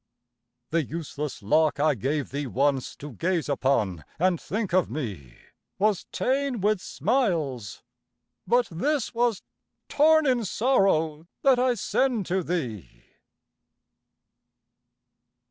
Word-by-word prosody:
The 165 0 +2
useless 150 -4 -5
lock 155 +8 +2
I 150 +1 +3
gave 140 +5 -2
thee 140 0 -3
once, 135 +1 0
To 145 +1 -9
gaze 170 +6 -1
upon 130 - 0
and 180 0 +1
think 210 -2 -3
of 185 0 +3
me, 100 - -6 0.4
Was 205 -2 +1
ta'en 270 -2 0
with 205 0 +1
smiles, 155 - -1 0.6
but 240 -1 +3
this 275 - -1
was 235 -3 0 0.5
torn 315 +1 +4
In 250 -4 +2
sorrow 180 - +1 0.2
that 265 -3 +5
I 250 -1 +2
send 235 -1 0
to 185 +2 0
thee! 120 - -4
170 Hz, 110 wpm, -26 LUFS, 140-230 Hz, 0.6 s, that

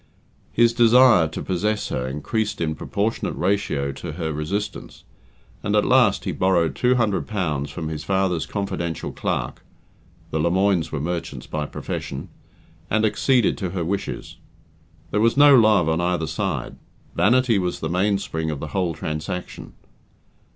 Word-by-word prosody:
His 120 0 +4
desire 120 -6 +6
to 80 - -6
possess 105 +3 -1
her 65 0 -2
increased 105 - -2
in 80 -2 -1
proportionate 105 +7 -2
ratio 80 -6 0
to - - -7
her 80 -3 -3
resistance, 90 +8 -4 0.6
and - - -1
at - - +3
last - - +4
he - - -1
borrowed 85 -5 +1
two 125 - +2
hundred 110 -6 0
pounds 75 -9 -2
from 80 +3 -5
his 80 -1 -5
father's 95 -4 0
confidential 95 -5 -3
clerk - - -3 0.7
(the 80 - -1
Lemoines 85 0 +1
were 75 - -2
merchants 85 +3 -4
by 75 -1 -3
profession), - - -5 0.6
and 110 +1 +2
acceded 125 +2 +2
to 95 - -2
her 85 - -1
wishes. 100 +3 -4 0.7
There 105 - +1
was 115 +3 +3
no 145 -1 +8
love 110 -8 +5
on 80 +1 +1
either 90 -2 0
side - - -3 0.4
vanity 120 -1 +3
was 90 -1 -2
the 80 - -3
mainspring 90 -3 -1
of 75 -3 -3
the 75 - -6
whole 90 -3 -1
transaction. 75 +3 -5
90 Hz, 150 wpm, -23 LUFS, 80-105 Hz, 0.7 s, no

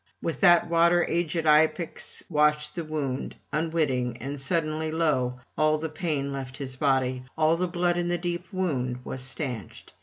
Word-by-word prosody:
With 165 - -3
that 175 -3 +6
water 170 +1 +4
aged 165 -1 0
Iapix 155 +2 +2
washed 150 -1 +2
the 170 - -3
wound, 145 -4 -3 0.2
unwitting; 150 -7 0
and 135 +3 -5
suddenly, 155 +1 -1
lo! 130 -6 +1 0.2
all 155 0 +3
the 160 +1 -4
pain 150 -3 -2
left 135 -1 -6
his 135 -3 -5
body, 130 -2 +1 0.2
all 160 +1 +4
the 180 +2 0
blood 175 0 +1
in 175 - 0
the 175 0 +1
deep 175 +1 -4
wound 130 -10 -2
was 130 - -4
stanched. 130 - -5
155 Hz, 160 wpm, -27 LUFS, 135-170 Hz, 0.2 s, that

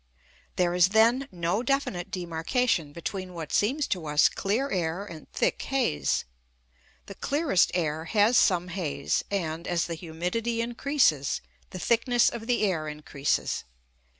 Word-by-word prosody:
There 175 -1 +1
is, 180 0 +5
then, 230 +6 +4
no 175 +4 -1
definite 245 -9 -1
demarcation 170 - -1
between 180 +3 -5
what 160 -3 -6
seems 265 +8 +2
to 175 -5 -2
us 150 0 +4
clear 225 +8 -1
air 180 +1 -1
and 160 -6 -11
thick - - 0
haze. 255 - 0 0.8
The - - -8
clearest 280 - +2
air 160 -2 -1
has 215 +5 +3
some 180 -5 +3
haze, 165 -6 -1
and, 170 -4 -3
as 175 -1 +1
the 170 - -4
humidity 180 +8 -3
increases, 235 - +1 0.3
the - - -7
thickness 235 +5 +3
of 230 -1 -7
the 245 -3 +1
air 170 -6 0
increases. 150 -2 -2
185 Hz, 140 wpm, -27 LUFS, 165-230 Hz, 0.8 s, is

